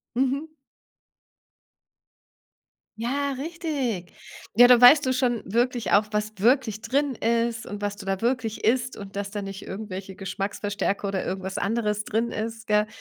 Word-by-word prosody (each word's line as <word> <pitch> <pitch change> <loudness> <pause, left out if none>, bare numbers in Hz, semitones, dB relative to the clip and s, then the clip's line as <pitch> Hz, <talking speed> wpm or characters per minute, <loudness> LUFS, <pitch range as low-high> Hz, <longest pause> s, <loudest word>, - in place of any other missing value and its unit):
Mhm. 270 +5 0 2.5
Ja, 280 +5 -1
richtig. 280 - -3 0.4
Ja, 245 +1 +9
da 250 -1 +7
weißt 275 +3 +8
du 260 - +2
schon 245 -3 0
wirklich 240 +3 0
auch, 210 +1 +5
was 210 0 -1
wirklich 225 -1 +2
drin 275 +4 0
ist 230 0 0
und 205 0 -7
was 205 0 -2
du 205 - -10
da 195 0 -2
wirklich 235 -2 -1
isst 250 +2 +1
und 200 -1 -9
dass 200 0 -3
da 210 - -4
nicht 195 0 -7
irgendwelche 190 -2 -7
Geschmacksverstärker 200 +1 -2
oder 195 -2 -2
irgendwas 190 +1 -4
anderes 210 -1 -1
drin 230 +3 -1
ist, 225 +1 -5
gell, 210 0 +3
220 Hz, 150 wpm, -25 LUFS, 200-250 Hz, 2.5 s, Ja